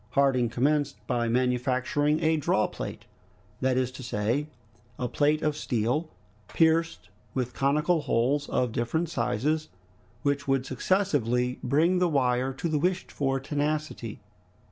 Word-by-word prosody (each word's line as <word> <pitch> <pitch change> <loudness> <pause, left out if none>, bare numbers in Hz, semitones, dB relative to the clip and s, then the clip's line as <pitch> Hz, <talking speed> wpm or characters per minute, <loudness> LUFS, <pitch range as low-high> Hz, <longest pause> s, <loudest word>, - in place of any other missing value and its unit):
Harding 135 -4 +3
commenced 145 +5 +1
by 120 0 0
manufacturing 130 +5 +1
a 160 0 +3
drawplate, 150 - -1 0.6
that 130 -1 +1
is 130 -1 0
to 130 - -10
say, 120 +5 -1 0.5
a 125 - -2
plate 150 +4 +1
of 150 -1 +1
steel, 130 +3 -1 0.4
pierced 160 - +1 0.3
with 125 -2 -1
conical 150 +5 +2
holes 140 +3 +1
of 125 -2 0
different 150 +9 -1
sizes, 150 +4 -1 0.5
which 140 0 0
would 135 -1 +1
successively 130 - 0
bring 160 +8 +2
the 180 -1 +3
wire 130 -3 +1
to 135 +6 -3
the 155 -2 0
wished 180 +4 -1
for 135 -1 0
tenacity. 145 -4 -3
140 Hz, 130 wpm, -27 LUFS, 125-155 Hz, 0.6 s, Harding